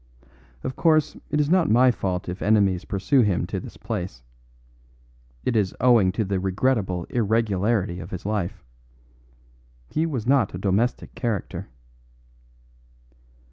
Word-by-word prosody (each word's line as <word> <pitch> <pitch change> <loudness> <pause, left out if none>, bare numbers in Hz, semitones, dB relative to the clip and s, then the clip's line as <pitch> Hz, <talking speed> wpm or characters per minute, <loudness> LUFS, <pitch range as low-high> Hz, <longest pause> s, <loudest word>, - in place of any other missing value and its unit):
Of 130 - -4
course, 155 -3 +2
it 150 - 0
is 150 - +2
not 175 0 +3
my 125 +3 +5
fault 90 -6 -3
if 90 +1 -5
enemies 100 -3 +2
pursue 105 +8 +2
him 100 -6 +1
to - - -4
this - - -10
place. 90 -9 -5 1.2
It 120 - 0
is 100 -4 +1
owing 115 -7 +5
to 110 +1 -1
the 95 0 -1
regrettable 95 -2 0
irregularity 105 -4 0
of - - -8
his 90 - -7
life. 100 -2 -2 1.3
He 160 +1 0
was 130 -9 -3
not 130 -7 +2
a - - -3
domestic 100 +6 0
character." 115 -5 -3
105 Hz, 135 wpm, -24 LUFS, 95-125 Hz, 1.3 s, my